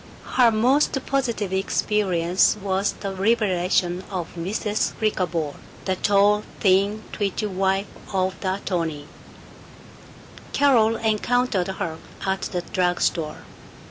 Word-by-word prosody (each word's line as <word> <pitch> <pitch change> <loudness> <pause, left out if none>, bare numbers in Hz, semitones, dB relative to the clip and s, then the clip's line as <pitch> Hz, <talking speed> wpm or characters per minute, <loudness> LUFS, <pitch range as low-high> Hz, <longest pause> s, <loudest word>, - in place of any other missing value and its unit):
Her 245 -2 +6
most 255 +7 +3
positive 235 -8 -1
experience 190 -2 +2
was 195 0 0
the 195 -1 -5
revelation 185 -3 +1
of 180 -4 -4
Mrs. 205 +5 -1
Flickerbaugh, 175 -8 -1 0.3
the 190 - 0
tall, 205 +2 +3 0.2
thin, 200 +2 +2
twitchy 205 +1 -2
wife 195 0 0 0.3
of 190 -1 0
the 185 -1 -1
attorney. 165 -7 -3 1.5
Carol 235 -6 +4
encountered 225 -2 +1
her 170 -4 -4 0.3
at 190 0 0
the 180 -2 -3
drug 180 -2 0
store. 155 -3 -1
195 Hz, 110 wpm, -23 LUFS, 180-215 Hz, 1.5 s, Her